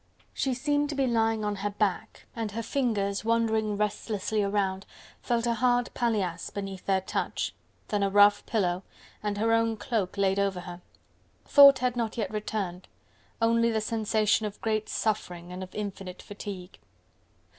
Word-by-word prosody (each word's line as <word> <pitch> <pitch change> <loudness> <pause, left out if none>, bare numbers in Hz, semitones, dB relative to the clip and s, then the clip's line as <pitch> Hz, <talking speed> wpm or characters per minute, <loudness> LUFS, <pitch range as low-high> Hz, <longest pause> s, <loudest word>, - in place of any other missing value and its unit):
She 265 -2 0
seemed 290 +2 0
to 295 - -3
be 275 -1 +2
lying 225 -3 +1
on 205 -1 -1
her 205 +2 -2
back, 205 +1 -2
and 225 -3 -3
her 230 +1 -3
fingers 210 -7 0
wandering 220 -2 +1
restlessly 210 0 -1
around 195 -1 -1 0.3
felt 235 -1 0
a 235 - +2
hard 245 +1 +2
paillasse, 200 -8 -1
beneath 195 -2 -6
their 190 -1 +2
touch, 190 - -2 0.4
then 205 -1 0
a 200 - +2
rough 205 +1 +5
pillow, 185 -5 0 0.4
and 210 -1 -2
her 225 +2 +2
own 230 -1 +2
cloak 210 -6 -2
laid 195 0 +2
over 195 -2 0
her: 175 0 -9 0.6
thought 280 -2 +8
had 250 -1 0
not 230 -2 -2
yet 215 -3 -2
returned, 205 -4 -3 0.6
only 230 0 +4
the 220 -1 +1
sensation 215 -1 +1
of 205 - -9
great 215 -1 -1
suffering 180 -5 -2
and 180 +1 -6
of 185 - -6
infinite 195 -3 -6
fatigue. 200 -3 -8
210 Hz, 160 wpm, -28 LUFS, 195-230 Hz, 0.6 s, thought